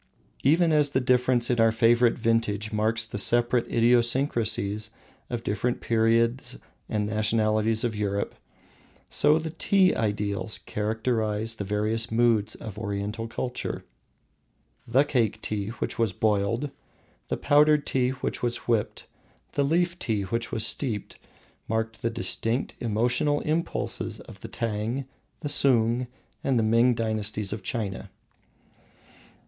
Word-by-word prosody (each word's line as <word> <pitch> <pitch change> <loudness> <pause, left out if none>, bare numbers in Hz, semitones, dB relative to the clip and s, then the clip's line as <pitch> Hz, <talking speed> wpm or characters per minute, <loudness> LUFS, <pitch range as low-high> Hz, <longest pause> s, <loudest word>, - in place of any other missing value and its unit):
Even 160 +4 +3
as 150 -1 +4
the 130 - +1
difference 125 -1 +2
in 115 -2 +4
favorite 115 +1 +3
vintage 110 -2 0
marks 110 +1 +1
the 100 - -5
separate 120 +2 +2
idiosyncrasies 115 -3 +2 0.4
of 120 -1 -4
different 115 +4 -1
periods 115 +2 +1 0.3
and 105 -1 0
nationalities 110 +1 +1
of 115 -3 -1
Europe, 100 -1 -2 0.8
so 150 - +4
the 160 0 -4
Tea 185 +3 +3
ideals 105 0 -2
characterise 110 0 -1
the 110 - -5
various 105 +3 -1
moods 110 -2 +2
of 105 -1 -8
Oriental 105 +2 -3
culture. 125 +2 -4 1.0
The 130 +4 +4
Cake 120 -7 0
tea 100 -2 -3
which 115 - -4
was 110 -4 +1
boiled, 110 +7 0 0.6
the - - -2
Powdered 150 0 +4
tea 125 -1 +1
which 130 0 -4
was 120 -1 0
whipped, 115 -3 0 0.5
the 140 - +1
Leaf 170 +4 +1
tea 110 -4 -1
which 115 +5 -3
was 110 - +1
steeped, 115 -4 -1 0.5
mark 110 0 -2
the 115 - -1
distinct 115 +1 -1
emotional 120 +6 +1
impulses 160 +2 -2
of - - -13
the - - -8
Tang, 115 +4 -3 0.4
the 145 - -3
Sung, 125 -3 +3 0.4
and 135 -2 +1
the 115 - +2
Ming 115 +3 +4
dynasties 110 -2 -2
of 105 - -6
China. 105 -5 -4
115 Hz, 130 wpm, -26 LUFS, 110-125 Hz, 1.0 s, as